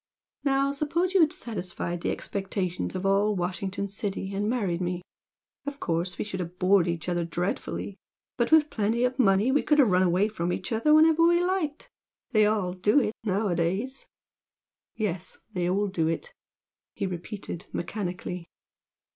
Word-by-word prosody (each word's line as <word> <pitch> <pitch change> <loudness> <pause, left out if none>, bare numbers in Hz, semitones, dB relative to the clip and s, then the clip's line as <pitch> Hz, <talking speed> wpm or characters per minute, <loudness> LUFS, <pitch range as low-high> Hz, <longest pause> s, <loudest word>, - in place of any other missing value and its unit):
Now, 275 0 +2
suppose 315 +6 0
you 380 - +5
had 310 -2 +5
satisfied 180 - -4
the - - -1
expectations 190 -2 -3
of 185 +1 -3
all 200 +2 +3
Washington 190 +2 -2
City 200 -1 -4
and 205 +2 0
married 195 -8 0
me, 180 0 -2 0.6
of 285 0 -4
course 170 +2 -1
we - - -2
should 190 -3 -5
have 180 0 -5
bored 185 -1 +4
each 170 -1 -3
other 175 -1 0
dreadfully 180 +3 -3 0.4
but 235 +3 0
with 315 -1 +5
plenty 225 +2 +1
of 250 +1 0
money 205 +1 +4
we 290 - +3
could 300 - +2
have 255 -9 +5
run 180 0 +4
away 185 +3 +3
from 180 -5 -2
each 245 - -4
other 230 +7 +2
whenever 315 +1 +6
we 345 +1 +5
liked 345 -5 -1 0.4
they 215 -3 +5
all 205 -4 0
do 205 +8 +3
it 220 -5 0
nowadays!" 200 +4 -1 0.9
"Yes 185 -4 -3 0.2
they 180 -1 0
all 200 +3 +2
do 170 -5 0
it!" 165 - -3 0.6
he 200 - -2
repeated, 180 0 -6
mechanically. 180 -2 -4
200 Hz, 165 wpm, -27 LUFS, 180-250 Hz, 0.9 s, whenever